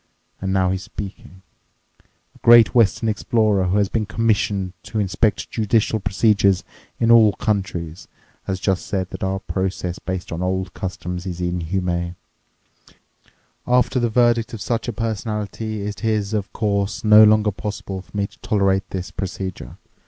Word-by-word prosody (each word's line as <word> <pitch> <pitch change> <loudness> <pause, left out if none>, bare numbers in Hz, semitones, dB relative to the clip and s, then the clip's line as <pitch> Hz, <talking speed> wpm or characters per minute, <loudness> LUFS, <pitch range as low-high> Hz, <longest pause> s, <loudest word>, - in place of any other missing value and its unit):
And 95 0 -2
now 95 -1 +2
he's 95 0 -2
speaking: 95 -2 -9 0.9
'A - - -21
great 120 -1 +7
Western 115 -1 +3
explorer 105 -2 +1
who 90 +3 +1
has 100 -1 +3
been 110 0 -2
commissioned 105 -4 0
to 110 - -6
inspect 100 +1 0
judicial 110 0 +1
procedures 100 -1 +2 0.4
in 115 0 +3
all 110 -3 +7
countries 90 -6 -3 0.4
has 95 -1 -2
just 95 -1 -1
said 95 -2 -2
that - - -6
our 95 0 0
process 95 -2 -3
based 95 -1 -5
on 85 +1 -4
old 95 0 -2
customs 90 0 -5
is 90 -1 -5
inhuman. 90 0 -2 1.5
After 125 +1 +2
the 120 -1 +1
verdict 120 0 +2
of 105 - -9
such 115 +2 -2
a - - 0
personality 110 -1 -3
it 105 +2 -6
is, 110 -2 0
of 105 -2 -2
course, 100 -1 -1
no 110 0 +8
longer 105 0 +4
possible 100 -1 -5
for 100 - -11
me 100 - +1
to - - -14
tolerate 100 -2 +1
this 95 -1 -5
procedure. 95 -7 -6
100 Hz, 150 wpm, -21 LUFS, 95-110 Hz, 1.5 s, no